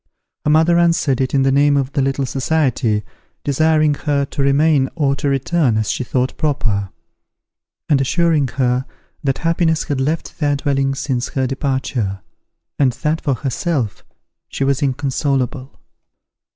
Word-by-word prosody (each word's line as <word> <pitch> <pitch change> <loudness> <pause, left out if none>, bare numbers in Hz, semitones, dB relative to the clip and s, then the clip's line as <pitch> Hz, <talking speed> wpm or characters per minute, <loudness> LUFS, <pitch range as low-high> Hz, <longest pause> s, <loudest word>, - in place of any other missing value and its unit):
Her - - +2
mother 160 +3 +4
answered 165 -6 +2
it 130 +1 -1
in 135 - +3
the 135 - +3
name 140 +1 +4
of 135 -1 -1
the 140 - 0
little 135 0 0
society, 130 -5 0 0.4
desiring 155 +1 +2
her 140 -1 -1
to 140 - -5
remain 140 0 +3
or 140 -4 +1
to 145 0 -1
return 135 -2 +1
as 110 -2 0
she - - -2
thought 125 +1 -1
proper; 110 - -1 1.0
and 145 -4 +3
assuring 160 0 +2
her, 125 +1 0 0.4
that 135 -2 0
happiness 165 -1 +1
had 140 -4 -2
left 155 +4 -2
their 145 -2 +1
dwelling 135 -1 0
since 130 -3 -2
her 130 -1 -1
departure, 130 -7 -2 0.6
and 130 -3 +3
that, 150 +5 -1
for 140 -3 0
herself, 135 - -2 0.5
she - - -3
was 135 -1 +1
inconsolable. 135 -1 -1
140 Hz, 150 wpm, -18 LUFS, 130-150 Hz, 1.0 s, mother